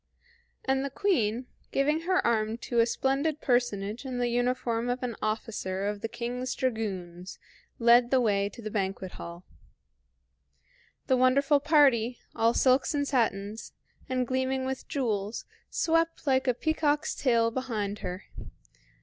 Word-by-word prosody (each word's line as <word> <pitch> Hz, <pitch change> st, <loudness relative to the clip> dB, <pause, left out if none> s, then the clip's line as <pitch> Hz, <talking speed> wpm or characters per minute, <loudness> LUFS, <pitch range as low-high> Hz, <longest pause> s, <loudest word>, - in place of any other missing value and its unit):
And 265 Hz, 0 st, +1 dB
the 280 Hz, -, -2 dB
Queen, 255 Hz, -, 0 dB, 0.3 s
giving 300 Hz, +3 st, +2 dB
her 370 Hz, 0 st, +2 dB
arm 220 Hz, -1 st, +1 dB
to 235 Hz, 0 st, -2 dB
a 230 Hz, -, +5 dB
splendid 275 Hz, +5 st, 0 dB
personage 240 Hz, -3 st, 0 dB
in 260 Hz, -2 st, -4 dB
the 245 Hz, 0 st, +1 dB
uniform 245 Hz, -1 st, 0 dB
of 250 Hz, +1 st, -2 dB
an 240 Hz, -2 st, -2 dB
officer 210 Hz, -3 st, -2 dB
of 205 Hz, 0 st, -2 dB
the -, -, -2 dB
King's 245 Hz, +2 st, -4 dB
dragoons, 190 Hz, -7 st, -3 dB, 0.4 s
led 240 Hz, +1 st, +5 dB
the 265 Hz, -, +4 dB
way 200 Hz, -4 st, +1 dB
to 225 Hz, +3 st, -12 dB
the 215 Hz, -, -5 dB
banquet 190 Hz, -2 st, -2 dB
hall. 170 Hz, +1 st, -9 dB, 1.6 s
The 260 Hz, -, +3 dB
wonderful 275 Hz, +3 st, +4 dB
party, 265 Hz, -6 st, +4 dB, 0.2 s
all 230 Hz, +1 st, +2 dB
silks 260 Hz, +3 st, +3 dB
and 285 Hz, -1 st, 0 dB
satins, 220 Hz, -5 st, -1 dB, 0.4 s
and 255 Hz, -1 st, 0 dB
gleaming 260 Hz, +1 st, -1 dB
with 265 Hz, 0 st, -4 dB
jewels, 220 Hz, -7 st, -2 dB, 0.2 s
swept 330 Hz, 0 st, 0 dB
like 265 Hz, -1 st, +2 dB
a 250 Hz, -, +3 dB
peacock's 300 Hz, 0 st, 0 dB
tail 230 Hz, -3 st, +2 dB
behind 215 Hz, -5 st, -3 dB
her. 180 Hz, +1 st, -5 dB
245 Hz, 140 wpm, -28 LUFS, 215-265 Hz, 1.6 s, a